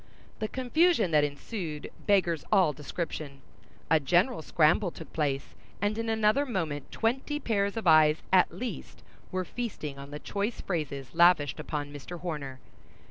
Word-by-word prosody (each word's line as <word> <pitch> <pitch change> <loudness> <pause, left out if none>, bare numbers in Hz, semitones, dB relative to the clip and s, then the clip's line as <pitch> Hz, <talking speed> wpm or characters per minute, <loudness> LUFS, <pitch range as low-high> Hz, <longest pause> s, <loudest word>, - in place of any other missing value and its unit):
The 215 - -1
confusion 260 - +2
that 150 -1 +4
ensued 150 +2 -4 0.2
beggars 175 -6 +3
all 185 -7 +4
description. 150 -2 -5 0.5
A 160 - +6
general 175 - +2
scramble 165 +5 +3
took 165 -1 -11
place, 140 -3 -1 0.3
and 205 +2 0
in 225 0 -2
another 220 +4 +3
moment 165 - -3
twenty 265 +6 -1
pairs 200 -5 0
of 225 - -3
eyes, 155 -2 +5
at 185 - +5
least, 250 0 -7 0.3
were 185 0 -2
feasting 165 - -5
on 140 0 -9
the 145 - -6
choice 205 +8 -3
phrases 140 -7 -4
lavished 170 -7 +4
upon 145 -1 -4
Mr. 155 +5 -8
Horner. 145 -7 -5
170 Hz, 145 wpm, -29 LUFS, 150-215 Hz, 0.5 s, A